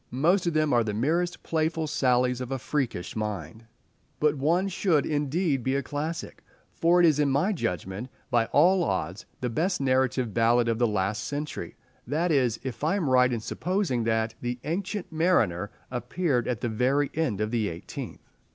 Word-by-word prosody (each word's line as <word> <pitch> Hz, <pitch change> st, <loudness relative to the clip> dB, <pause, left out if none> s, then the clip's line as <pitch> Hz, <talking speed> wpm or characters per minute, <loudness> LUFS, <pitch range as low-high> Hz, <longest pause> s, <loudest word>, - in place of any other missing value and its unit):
Most 170 Hz, +8 st, +2 dB
of 170 Hz, -, 0 dB
them 155 Hz, -2 st, +2 dB
are 120 Hz, -1 st, +4 dB
the 105 Hz, -2 st, -3 dB
merest 170 Hz, +9 st, 0 dB
playful 160 Hz, 0 st, 0 dB
sallies 125 Hz, -4 st, +1 dB
of 125 Hz, +1 st, -5 dB
a 135 Hz, -, 0 dB
freakish 125 Hz, -7 st, -3 dB
mind. 105 Hz, -1 st, -4 dB, 0.5 s
But 150 Hz, -1 st, +3 dB
one 165 Hz, +7 st, +1 dB
should, 175 Hz, -5 st, +1 dB
indeed, 150 Hz, 0 st, 0 dB
be 130 Hz, +3 st, 0 dB
a 140 Hz, -, 0 dB
classic, 155 Hz, +3 st, -4 dB, 0.3 s
for 170 Hz, +2 st, +3 dB
it 175 Hz, -, +6 dB
is 155 Hz, -3 st, +4 dB
in 145 Hz, -1 st, +3 dB
my 150 Hz, +10 st, +2 dB
judgment 95 Hz, -, -3 dB, 0.2 s
by 115 Hz, -1 st, +3 dB
all 180 Hz, +5 st, +4 dB
odds 90 Hz, -, -2 dB
the 125 Hz, -, -1 dB
best 175 Hz, -, 0 dB
narrative 130 Hz, -3 st, +1 dB
ballad 115 Hz, +1 st, +3 dB
of 115 Hz, 0 st, 0 dB
the 120 Hz, -, +4 dB
last 105 Hz, +1 st, -1 dB
century—that 150 Hz, +2 st, -4 dB
is 125 Hz, -6 st, +2 dB
if 130 Hz, +1 st, -6 dB
I 160 Hz, +5 st, +2 dB
am 165 Hz, -10 st, 0 dB
right 125 Hz, 0 st, +5 dB
in 115 Hz, -2 st, -2 dB
supposing 175 Hz, -, -1 dB
that 110 Hz, 0 st, 0 dB
"The 120 Hz, 0 st, -2 dB
Ancient 190 Hz, +4 st, -3 dB
Mariner" 120 Hz, -, +2 dB, 0.2 s
appeared 125 Hz, +1 st, -1 dB
at 125 Hz, -4 st, -2 dB
the 120 Hz, -, -1 dB
very 130 Hz, +6 st, +1 dB
end 145 Hz, -11 st, -1 dB
of 105 Hz, 0 st, -1 dB
the 110 Hz, -4 st, 0 dB
eighteenth. 85 Hz, +1 st, -8 dB
135 Hz, 180 wpm, -27 LUFS, 115-160 Hz, 0.5 s, it